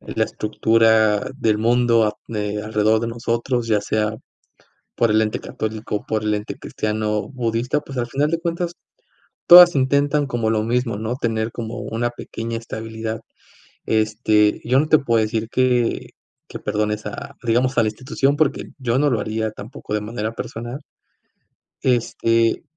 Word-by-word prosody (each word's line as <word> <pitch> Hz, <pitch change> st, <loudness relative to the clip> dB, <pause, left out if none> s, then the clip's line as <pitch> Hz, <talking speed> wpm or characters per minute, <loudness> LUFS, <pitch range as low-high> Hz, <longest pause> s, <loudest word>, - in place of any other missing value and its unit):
la -, -, -1 dB
estructura 110 Hz, -1 st, +2 dB
del 110 Hz, -5 st, +1 dB
mundo 115 Hz, 0 st, +3 dB
ap 105 Hz, 0 st, -1 dB
mm, 115 Hz, -, -5 dB
eh, 105 Hz, 0 st, -2 dB
alrededor 110 Hz, +1 st, +2 dB
de 115 Hz, -, -2 dB
nosotros, 120 Hz, +1 st, -2 dB
ya 110 Hz, -2 st, +2 dB
sea 105 Hz, +1 st, 0 dB, 0.9 s
por 115 Hz, -, +2 dB
el 110 Hz, +1 st, +4 dB
ente 110 Hz, -1 st, -1 dB
católico 110 Hz, 0 st, -4 dB
o -, -, -6 dB
por 110 Hz, -1 st, -1 dB
el 105 Hz, -, +1 dB
ente 105 Hz, 0 st, -5 dB
cristiano, 105 Hz, 0 st, -2 dB
budista, 125 Hz, +2 st, -1 dB
pues, 140 Hz, -2 st, -10 dB
al 120 Hz, -1 st, -1 dB
final 145 Hz, +4 st, 0 dB
de 165 Hz, 0 st, -1 dB
cuentas 170 Hz, 0 st, -2 dB, 0.8 s
todas 175 Hz, -1 st, +10 dB
intentan 140 Hz, +2 st, +2 dB
como 115 Hz, -4 st, -1 dB
lo 110 Hz, -1 st, +1 dB
mismo, 120 Hz, 0 st, 0 dB
¿no? 110 Hz, +3 st, -3 dB
Tener 115 Hz, -3 st, -1 dB
como 115 Hz, 0 st, -6 dB
una 120 Hz, +2 st, -2 dB
pequeña 115 Hz, -1 st, -6 dB
estabilidad. 110 Hz, 0 st, -5 dB, 0.7 s
Este, 110 Hz, -1 st, +2 dB
yo 125 Hz, +2 st, +3 dB
no 155 Hz, -, -2 dB
te 155 Hz, 0 st, +5 dB
puedo 115 Hz, -4 st, +1 dB
decir 110 Hz, +1 st, -2 dB
que 125 Hz, -2 st, +1 dB, 0.4 s
que -, -, -7 dB
perdones 105 Hz, 0 st, -2 dB
a 105 Hz, -, -7 dB
digamos, 125 Hz, +3 st, +1 dB
a -, -, +6 dB
la 110 Hz, -, +1 dB
institución, 135 Hz, +5 st, 0 dB
porque 150 Hz, -1 st, +1 dB
yo 130 Hz, -1 st, 0 dB
no 145 Hz, -, +3 dB
lo 115 Hz, -5 st, 0 dB
haría 110 Hz, +1 st, -2 dB
tampoco 105 Hz, 0 st, -9 dB
de 105 Hz, -, 0 dB
manera 110 Hz, 0 st, -4 dB
personal. 120 Hz, +4 st, -6 dB, 1.0 s
Este 115 Hz, -2 st, +1 dB
115 Hz, 165 wpm, -21 LUFS, 110-125 Hz, 1.0 s, todas